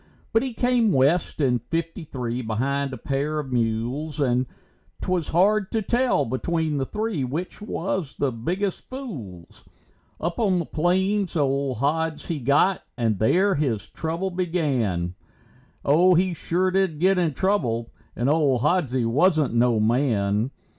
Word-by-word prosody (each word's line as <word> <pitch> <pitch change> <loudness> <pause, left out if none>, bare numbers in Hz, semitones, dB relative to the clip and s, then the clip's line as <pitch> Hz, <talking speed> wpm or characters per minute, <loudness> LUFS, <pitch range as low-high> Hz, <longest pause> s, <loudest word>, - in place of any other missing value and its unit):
But 225 - +4
he 260 -1 -3
came 245 -3 +2
west 145 +5 +2
in 125 -4 +2
fifty 165 - -4
three, 125 -4 -4
behind 135 +5 -1
a 130 - -6
pair 140 +3 -2
of 140 -3 -4
mules, 125 +6 -1
And 125 -2 +1 0.5
'twas 180 -4 -1
hard 195 +4 +2
to 220 -1 0
tell 240 - +2
between 155 +5 -1
the 135 -1 -1
three 210 -8 -2
which 155 +11 -4
was 190 -6 -3
the 140 -2 0
biggest 180 - -3
fools. 130 - -8 0.6
Up 170 +1 -3
on 195 -5 +2
the 170 - -1
plains 190 +5 0
old 140 -3 0
Hods 155 +4 -1
he 165 -3 -3
got 140 +9 +3 0.2
and 110 -5 0
there 190 - +3
his 125 - -1
trouble 170 +4 -3
began. 135 - -1 0.7
Oh, 175 +6 +5
he 180 +1 +2
sure 180 +3 0
did 190 -5 +1
get 190 +2 +3
in 160 -5 0
trouble, 120 - 0 0.2
and 120 - -1
old 140 -5 +2
Hodsie 140 -5 +1
wasn't 150 +3 +2
no 120 -1 +3
man. 110 -2 +1
150 Hz, 145 wpm, -24 LUFS, 125-185 Hz, 0.7 s, Oh